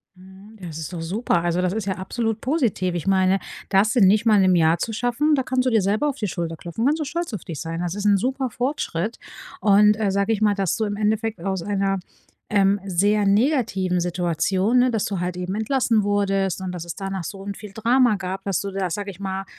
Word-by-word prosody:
Mhm, 190 +4 -16
das 170 -5 -7
ist 160 0 -6
doch 175 -2 -5
super, 180 +1 0
also, 175 +1 0
das 185 0 0
ist 220 -2 -3
ja 190 - 0
absolut 220 +4 -3
positiv. 235 - 0
Ich 175 +1 -4
meine, 190 0 +3 0.3
das 200 +4 +3
in 215 -6 +6
nicht 210 +4 +3
mal 215 -3 +5
'nem 185 -1 +4
Jahr 165 0 +4
zu 225 - -3
schaffen, 245 +7 +1
da 265 - 0
kannst 255 0 0
du - - +3
dir 225 -4 +3
selber 210 +10 +1
auf 280 - -5
die 210 - -2
Schulter 170 -3 -4
klopfen, 175 +9 -4
kannst 300 +4 +2
du 305 - -2
stolz 335 -1 -4
auf 205 - -5
dich 155 -4 -6
sein. 165 0 -4
Das 175 +1 -3
ist 205 0 -4
'n 200 -1 +5
super 260 +4 -1
Fortschritt 235 - -2 0.4
und, 210 +1 +5
sage 200 +3 +1
ich 215 - -3
mal, 210 -1 +4
dass 195 -4 0
du 220 - -1
im 205 -1 -3
Endeffekt 220 0 0
aus 190 -1 -2
einer, 195 -1 0 0.5
ähm, 200 -1 +3
sehr 200 +3 +2
negativen 200 - +1
Situation, 180 +6 +1
ne 250 0 +3
dass 225 -3 0
du 195 -3 -3
halt 180 0 -3
eben 180 +2 -3
entlassen 225 -1 +1
wurdest 195 -2 0
und 185 -1 -4
dass 175 -2 -5
es 170 -1 -6
danach 195 -2 -4
so 195 +3 -7
'n 200 -1 -4
viel 210 -1 -10
Drama 235 +2 +3
gab 190 0 -5
dass 195 -2 -1
du 200 - -4
da, 190 -1 -2
sage 200 +3 -4
ich 185 - -15
mal, 195 0 -3
200 Hz, 235 wpm, -23 LUFS, 185-220 Hz, 0.5 s, in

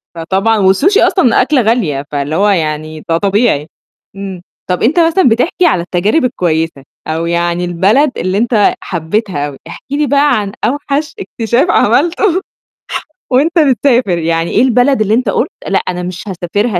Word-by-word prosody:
فطبعًا 195 +7 0 0.2
والSushi 390 - +2
أصلًا 250 -11 +3
أكلة 265 0 +2
غالية 185 - 0
فاللي 145 +2 -2
هو 205 +3 +2
يعني 155 -3 -2
ده 165 - +2
طبيعي. 200 -6 +1 0.5
إمم، 195 -2 -7 0.3
طَب 180 - -1
أنت 310 +9 +2
مثلًا 330 -3 +3
بتحكي 250 +10 +1
على 185 - +2
التجارب 195 - 0
الكويسة 165 - -1 0.2
أو 160 +1 -2
يعني 170 +1 -1
البلد 205 - +2
اللي 185 +2 -1
أنت 225 -2 +2
حبّيتها 170 -2 -2
أوي، 140 -2 -9
احكِ - - -10
لي 290 0 0
بقى 280 -4 +3
عن 200 -1 -4
أوحش 290 +3 -2
اكتشاف 240 - -1
عملته 345 - +2 0.9
وأنت 320 +7 +2
بتسافر، 250 - +2
يعني 165 0 -1
إيه - - +2
البلد 255 0 +2
اللي 215 0 +1
أنت 235 -2 +1
قُلت - - 0 0.2
لأ، 195 - +1
أنا 180 0 -4
مش 180 0 -6
هاسافرها 190 +2 -2
205 Hz, 155 wpm, -13 LUFS, 170-260 Hz, 0.9 s, أصلًا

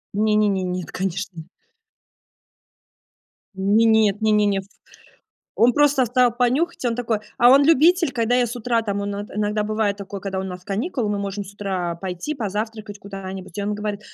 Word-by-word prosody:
Не-не-не, 210 -2 +2
нет, 180 -1 -4
конечно. 180 -2 -4 2.1
Не, 205 +4 +3
нет, 220 -2 +3
не-не-не, 210 -2 +2
втв 200 - -21 0.8
он 240 +1 +4
просто 290 -3 +4
встал 245 0 +3
понюхать. 260 +8 0
Он 230 - 0
такой 230 -3 -1 0.2
а 245 -1 +6
он 275 +2 +7
любитель, 330 +2 +4
когда 235 -1 0
я 250 -1 +3
с 240 +2 -6
утра 235 0 0
там, 200 -2 -3
он 200 0 -3
от 205 +1 -6
иногда 210 0 -1
бывает 215 -1 -1
такое, 200 0 -7
когда 190 -1 -3
у - - -3
нас 180 -1 -7
каникулы, 215 - -2
мы 205 - -1
можем 200 0 -4
с 195 - -12
утра 185 -4 -3
пойти 185 - -4
позавтракать 215 -2 -4
куда-нибудь, 195 -1 -8
и - - -1
он 205 +1 -1
говорит: 210 0 -4
210 Hz, 170 wpm, -22 LUFS, 195-235 Hz, 2.1 s, он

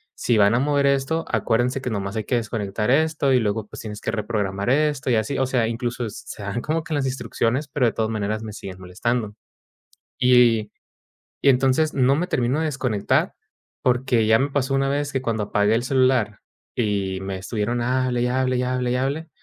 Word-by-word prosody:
si 115 - +1
van 100 +2 +5
a - - +3
mover 140 +1 +2
esto, 140 +4 0
acuérdense 120 +3 0
que 125 - -3
nomás 100 -2 -3
hay 110 - -1
que 125 - 0
desconectar 105 -2 -2
esto 155 -1 +2
y 130 - +5
luego, 105 -1 -1
pues, - - -9
tienes 105 -2 -7
que - - -2
reprogramar 105 -2 -2
esto 145 -1 +1
y - - +4
así". 110 +5 -1
O 130 - +2
sea, 125 -3 +1
incluso 120 +1 -3
s 105 - -8
se 105 - -8
dan 100 +4 -3
como 160 +2 -1
que 155 - -5
las 140 -2 0
instrucciones, 125 +2 -1
pero 135 -2 +1
de - - +1
todas 110 0 -1
maneras 110 0 -2
me 110 - -7
siguen 95 -3 -8
molestando, 105 +4 -2 0.8
y 120 -4 +4 0.7
y 140 - +6
entonces, 135 +4 +3
no 135 0 +3
me 170 +5 0
termino 130 -4 0
de 160 - 0
desconectar, 130 -9 0 0.5
porque 125 -2 +2
ya 110 0 +5
me 140 +2 +1
pasó 135 -1 0
una 135 0 +1
vez 145 +1 -1
que 130 - 0
cuando 115 -4 -1
apagué 105 +1 +2
el 120 - 0
celular 130 -5 +2 0.4
y 100 -4 -1
me 95 0 -4
estuvieron, 115 +4 -2
hable 125 0 0
y, - - +1
hable 130 0 +1
y, 125 - 0
hable 125 -1 -1
y, - - +1
hable, 140 +5 -2
125 Hz, 205 wpm, -23 LUFS, 110-135 Hz, 0.8 s, y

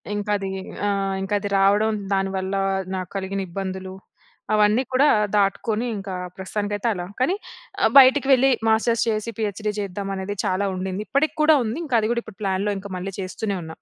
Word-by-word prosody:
ఇంకా 205 0 -2
అది, 195 -1 -4 0.4
ఆహ్, 195 -1 0
ఇంకా 195 +2 -3
అది 205 - -4
రావడం 205 +3 +4 0.2
దానివల్ల 195 0 -1 0.4
నాకు 185 0 -4
కలిగిన 195 +1 -3
ఇబ్బందులు 190 0 -5 0.6
అవన్నీ 215 +4 +4
కూడా 280 +3 +5 0.3
దాటుకొని 210 +3 +1
ఇంకా 195 -1 -6 0.2
ప్రస్తుతానికైతే 205 +3 -3
అలా. 175 -2 -5
కానీ 345 +10 +2 0.6
బయటికి 270 +1 +7
వెళ్ళి 265 +1 +5 0.2
మాస్టర్స్ 225 +1 +3
చేసి 215 +1 -2
పీఎచ్డీ 210 0 -2
చేద్దాం 200 0 -4
అనేది 190 +2 -4
చాలా 190 +2 0
ఉండింది. 190 +2 -3
ఇప్పటికి 285 +4 +1
కూడా 310 0 +6
ఉంది. 225 +3 -3
ఇంకా 245 -5 +1
అది 215 +1 -1
కూడా 235 - -1
ఇప్పుడు 220 - -13
ప్లాన్‌లో 195 +2 0 0.2
మళ్ళీ 195 +2 -5
చేస్తూనే 195 +2 -3
ఉన్నా. 160 0 -9
205 Hz, 160 wpm, -23 LUFS, 190-220 Hz, 0.6 s, బయటికి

